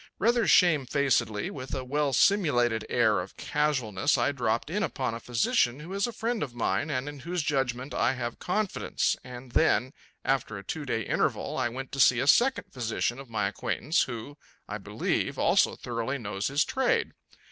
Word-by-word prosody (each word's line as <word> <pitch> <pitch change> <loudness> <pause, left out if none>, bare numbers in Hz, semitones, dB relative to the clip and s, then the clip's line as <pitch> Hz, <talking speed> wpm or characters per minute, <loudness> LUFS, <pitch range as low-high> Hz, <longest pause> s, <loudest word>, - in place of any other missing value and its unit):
Rather 230 0 +2
shamefacedly, 140 - +3
with 130 -1 -6
a 130 - -3
well 145 +2 0
simulated 125 - +3
air 110 -5 +3
of 90 +2 -7
casualness, 145 -5 0
I - - +2
dropped 120 +1 -1
in 205 +4 -1
upon 130 - -2
a 115 - -5
physician 120 +2 +1
who 165 +5 -8
is 200 +4 0
a - - -4
friend 230 0 -2
of 125 -5 -4
mine 145 +5 0
and 130 -1 -2
in 145 -1 -7
whose 170 +3 -3
judgment 135 -2 -1
I - - +2
have 120 -2 -5
confidence; 205 +2 0
and 125 0 -10
then, 130 -3 +2 0.3
after 130 -5 0
a 100 - -8
two 150 +8 -5
day 115 -4 -1
interval, - - -1
I 130 -2 0
went 135 +3 -7
to 135 - -5
see 125 -2 +6
a 130 - 0
second 245 - +3
physician 120 0 -2
of 135 -3 -10
my 105 -3 0
acquaintance 145 - 0
who, 125 +4 -5 0.3
I - - -5
believe, - - -2
also - - +3
thoroughly 120 +3 -3
knows 100 -4 -3
his 140 +3 +2
trade. 460 - +1
135 Hz, 180 wpm, -28 LUFS, 120-150 Hz, 0.3 s, see